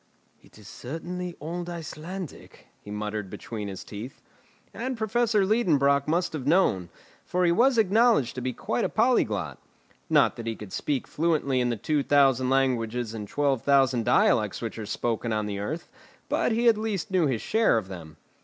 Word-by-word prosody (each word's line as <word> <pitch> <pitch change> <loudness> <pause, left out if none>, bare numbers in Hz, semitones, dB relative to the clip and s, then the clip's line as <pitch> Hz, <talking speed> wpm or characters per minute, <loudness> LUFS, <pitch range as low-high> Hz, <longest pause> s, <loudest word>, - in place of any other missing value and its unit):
"It - - -20
is 105 -2 -14
certainly 175 +8 -6
old 170 +3 -5
Icelandic," 170 +1 -8 0.2
he - - -13
muttered 105 -1 -4
between 105 0 -6
his 95 -2 -7
teeth. 110 +6 -8 0.5
And 255 +1 -4
Professor 220 -1 +1
Liedenbrock 145 - +2
must 175 +3 0
have 140 -4 -4
known, 145 - +2 0.3
for 180 0 0
he 170 - +4
was 245 +7 +3
acknowledged 220 - +3
to 130 - -5
be 130 +1 -1
quite - - -2
a - - 0
polyglot. - - +1 0.5
Not - - +3
that 115 - -6
he 115 - -2
could 105 -3 -10
speak 140 -4 -1
fluently 150 -5 +1
in 125 - +1
the 120 - -1
two 150 +7 0
thousand 135 -3 +3
languages 125 -3 0
and 105 -2 -6
twelve 140 0 0
thousand 135 -4 +3
dialects 105 -4 +3
which 115 -1 -5
are 105 - -6
spoken 115 +1 -2
on 105 -1 0
the 100 -1 -4
earth, 155 +12 -4 0.4
but - - +1
he 230 +2 +1
knew 240 - +7
at 225 - +3
least 215 -2 -2
his 155 - +1
share 220 - +3
of 105 -4 -3
them. 80 -5 -10
140 Hz, 180 wpm, -26 LUFS, 115-180 Hz, 0.5 s, knew